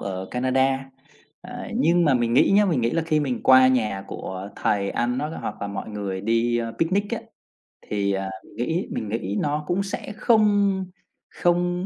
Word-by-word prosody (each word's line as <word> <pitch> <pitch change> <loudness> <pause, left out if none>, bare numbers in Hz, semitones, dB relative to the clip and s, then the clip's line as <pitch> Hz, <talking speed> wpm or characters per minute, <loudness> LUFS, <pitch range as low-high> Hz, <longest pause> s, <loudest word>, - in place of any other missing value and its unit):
ở 95 -1 -5
Canada. 130 +1 0 0.5
À, - - -8
nhưng 170 +2 +3
mà 140 -4 +4
mình 120 -1 +1
nghĩ - - +5
nhá, 210 0 +6
mình 160 -10 +1
nghĩ 115 +1 +1
là 165 - 0
khi 155 -2 +2
mình 130 -5 -2
qua 130 0 +7
nhà 105 -6 0
của 95 +1 -6
thầy 100 -1 0
ăn, 125 +1 -1
nó 150 - -2
có - - -7
hoặc - - -6
là - - -1
mọi 100 -1 -5
người 100 -3 -4
đi, 115 +2 +1
ờ, 115 -1 -3
picnic 185 +5 +1
á, 235 - -1 0.7
thì, 100 -1 0
à, 95 0 -2
mình - - -18
nghĩ 170 +4 -1
mình 105 - -4
nghĩ 105 -2 -2
nó 150 +1 -1
cũng 190 +3 0
sẽ 200 +1 -5
không 205 -4 +3 0.4
không 175 +1 0
130 Hz, 195 wpm, -24 LUFS, 105-175 Hz, 0.7 s, qua